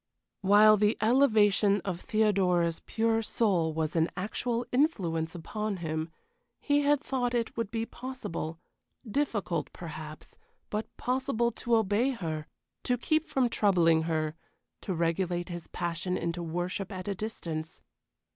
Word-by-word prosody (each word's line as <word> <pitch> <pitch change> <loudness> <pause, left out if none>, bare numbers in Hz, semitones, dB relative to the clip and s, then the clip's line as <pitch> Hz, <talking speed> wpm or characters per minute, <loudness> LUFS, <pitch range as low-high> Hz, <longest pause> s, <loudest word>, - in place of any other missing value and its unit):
While 210 +2 +7
the 210 +2 +2
elevation 215 -4 +4
of 180 -3 -3
Theodora's 185 -6 +2
pure 225 0 +1
soul 190 -8 +1
was 155 0 -2
an 165 0 +3
actual 230 +5 -2
influence 180 - +1
upon 210 +4 -3
him, 160 -1 -3 0.5
he 290 0 +2
had 290 0 +3
thought 250 -4 -1
it 230 -1 -1
would 230 -3 -2
be 225 0 -2
possible 240 -12 -5 0.5
difficult, 215 - -1
perhaps 155 - -9 0.3
but 215 +1 -2
possible 250 -2 0
to 235 +1 0
obey 220 +3 +2
her 160 - -4 0.3
to 250 - 0
keep 310 +6 +1
from 260 -2 +2
troubling 175 -8 +3
her 155 -1 0 0.5
to 190 - -3
regulate 175 +1 0
his 175 -1 -6
passion 175 +2 -2
into 170 +1 -2
worship 175 +4 -3
at 185 -1 -6
a 200 - 0
distance. 170 -6 -5
200 Hz, 135 wpm, -29 LUFS, 170-230 Hz, 0.5 s, While